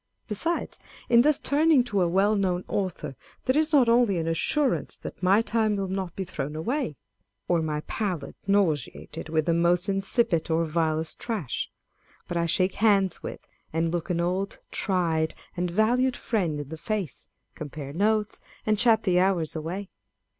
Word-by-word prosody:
Besides, 325 +11 -2 0.3
in 235 -1 +7
thus 295 +2 +3
turning 295 -2 +4
to 205 -6 0
a 175 - +3
well 195 +5 +3
known 185 -3 0
author, 185 -8 -3 0.3
there 255 - +2
is 310 +1 +2
not 275 -6 +5
only 230 -5 +4
an 165 -1 -2
assurance 260 - +1
that - - -9
my 195 +4 +4
time 220 -2 +1
will 195 -1 -2
not 190 -2 -3
be 195 - -2
thrown 150 -4 -5
away, 230 - -2 0.5
or 175 -2 +2
my 150 -1 -2
palate 180 -5 -3
nauseated 160 - 0
with 155 -1 +1
the 170 - +2
most 175 +2 +2
insipid 195 -3 +1
or 165 +1 +2
vilest 160 0 -1
trash, 215 - -3
â€" - - -36
but 175 - -3
I 170 0 +1
shake 185 +3 +1
hands 200 -4 +3
;vith, - - -8 0.3
and 165 +1 0
look 170 -2 -2
an 175 -1 0
old, 185 +3 -1
tried, 165 -5 0 0.2
and 180 0 -1
valued 245 +7 +2
friend 175 -10 -1
in 145 -2 -6
the 160 - -6
face, 200 - -4 0.2
â€" - - -41
compare 145 -2 -7
notes, 210 +4 +1 0.2
and 215 -1 +2
chat 225 -2 +4
the 180 -3 +3
hours 180 -5 +1
away. 180 +5 -5
185 Hz, 175 wpm, -26 LUFS, 165-215 Hz, 0.5 s, in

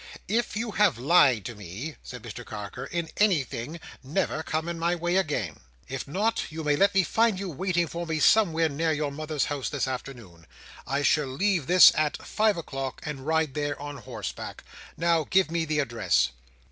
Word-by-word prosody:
"If 220 +1 0
you 225 0 -2
have 205 - +3
lied 130 - +4
to 120 - -5
me," 105 - -7
said 125 -4 -9
Mr 120 - -7
Carker, 105 +4 -7
"in 170 -1 -3
anything, 160 - 0 0.2
never 155 +2 -1
come 160 +1 -2
in 170 -1 -4
my 170 +1 +1
way 175 +1 -1
again. 145 - -1 0.3
If 135 0 -5
not, 205 +10 0
you 160 0 -5
may 150 -1 +2
let 200 +5 +3
me 190 - +5
find 225 +1 +2
you 195 -2 -4
waiting 175 +2 0
for 170 +1 -5
me 160 -1 -1
somewhere 165 -5 +4
near 160 +2 0
your 150 -2 -1
mother's 155 0 -2
house 145 -3 -3
this 140 -2 -1
afternoon. 120 -10 -7 0.4
I 140 +2 0
shall 150 0 +3
leave 170 +2 0
this 180 +1 +9
at 155 -1 0
five 215 -2 +2
o'clock, 135 -5 -5
and 145 -2 -6
ride 160 -3 +1
there 145 0 -2
on 145 0 -6
horseback. 115 -6 -7 0.3
Now, 165 -1 +2
give 185 -4 +3
me 165 -1 0
the 155 -1 -1
address." 115 - +1
155 Hz, 185 wpm, -27 LUFS, 135-175 Hz, 0.4 s, this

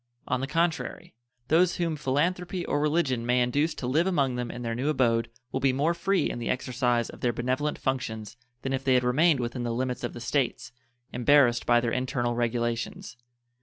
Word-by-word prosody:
On 125 - 0
the 135 - -2
contrary, 165 -4 -1 0.4
those 170 +3 +4
whom 170 -3 -1
philanthropy 175 +6 -1
or 145 - 0
religion 150 -6 +1
may 125 +1 +2
induce 145 +6 +1
to - - -5
live 155 +8 +2
among 140 -8 +1
them 125 -1 -3
in 120 - -6
their 115 -1 -2
new 130 +6 -1
abode 120 -5 +2 0.2
will - - -1
be 135 -1 +2
more 150 +6 +1
free 195 +3 +1
in - - -4
the 115 - -3
exercise 125 -2 0
of - - -14
their 120 - +2
benevolent 130 +5 -1
functions 115 -5 -3 0.3
than 135 - -2
if 135 0 -2
they 130 -1 +3
had 125 - +3
remained 145 +4 +3
within 120 +1 -3
the 120 - -2
limits 125 +1 -2
of - - -3
the - - -8
States, 120 -1 -1 0.4
embarrassed 125 -1 +4
by 120 0 +5
their 120 -1 -1
internal 125 -1 -1
regulations. 120 - -2
130 Hz, 200 wpm, -27 LUFS, 120-150 Hz, 0.4 s, by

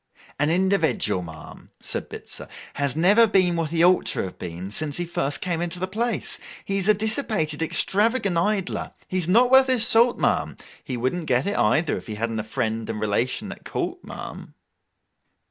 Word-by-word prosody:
'An 145 +1 +2
individual, 190 - +1
ma'am,' 80 -2 -11
said - - -4
Bitzer, - - -8 0.3
'has 140 -2 -1
never 205 +8 +5
been 185 -4 +3
what 165 -2 -1
he 165 +1 +1
ought 180 0 +3
to - - -1
have 95 - -8
been, 90 +3 -7
since 145 +5 -1
he 175 - -2
first 145 -4 -2
came 170 -2 -2
into 175 +1 -2
the 185 +1 -3
place. 225 +3 -2 0.3
He 195 0 -1
is 195 - -1
a 215 - +5
dissipated, 210 - 0
extravagant 205 +4 +1
idler. 190 +2 -1
He 185 - -1
is 170 - 0
not 240 +7 +4
worth 265 0 +7
his 250 -4 +5
salt, 235 +1 +6
ma'am. - - 0 0.3
He 125 - -5
wouldn't 140 +8 -2
get 125 +1 +1
it 200 - -1
either, 160 0 +2
if - - -10
he 110 - -5
hadn't 115 +1 -3
a - - -3
friend 110 0 -3
and - - -4
relation 110 +4 -1
at - - -11
court, - - -4
ma'am! - - -9
175 Hz, 190 wpm, -23 LUFS, 130-205 Hz, 0.3 s, worth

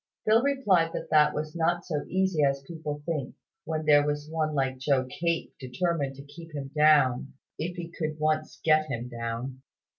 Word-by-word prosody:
Phil 220 +2 +5
replied 210 -12 +2
that - - -5
that 150 -1 +6
was 155 +2 -4
not 170 +1 +1
so 150 -4 -2
easy 190 -4 +1
as 140 -1 +1
people 160 -3 -4
might 145 0 -11
think, 150 -6 -3 0.3
when 155 -1 -2
there 145 -1 +6
was 150 0 -2
one 155 -1 -1
like 130 -1 0
Joe 130 -1 +2
Cape 165 +6 -2
determined 140 +1 -1
to 140 - -10
keep 165 +2 -12
him 135 -1 -5
down, 145 -4 +4 0.3
if 175 +2 -3
he 170 -1 -4
could 155 -2 -3
once 155 0 -1
get 155 -1 +4
him 120 -3 -4
down. 120 +2 -5
155 Hz, 185 wpm, -28 LUFS, 140-165 Hz, 0.3 s, that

